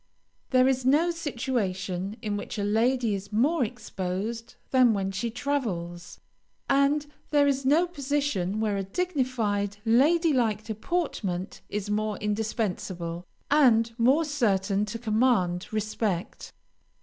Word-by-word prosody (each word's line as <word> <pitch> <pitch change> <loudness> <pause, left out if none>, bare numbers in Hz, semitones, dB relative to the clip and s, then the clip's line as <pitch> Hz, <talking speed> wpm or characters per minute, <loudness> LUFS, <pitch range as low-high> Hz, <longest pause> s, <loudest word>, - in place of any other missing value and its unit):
There 255 -1 +4
is 260 -1 +1
no 300 +7 +3
situation 210 - -3
in 210 -2 -1
which 205 - -5
a 205 - -1
lady 230 +2 +2
is 200 +1 -5
more 270 +8 +2
exposed 220 0 -4 0.2
than 250 -4 +5
when 195 -1 -1
she 215 +5 -2
travels, 220 -10 -3 0.5
and 280 +2 +3 0.2
there 290 -1 +4
is 275 -1 0
no 315 +6 +5
position 280 - -1
where 215 -2 0
a 195 - -1
dignified, 225 - -1
lady 305 +8 +4
like 225 -5 +1
deportment 215 - -3
is 205 0 -3
more 215 -1 -1
indispensable 195 -5 -3 0.2
and 235 -6 +4
more 270 +8 +4
certain 205 -8 +1
to 220 +2 -5
command 215 -6 +1
respect. 215 -3 -3
225 Hz, 125 wpm, -27 LUFS, 200-265 Hz, 0.5 s, than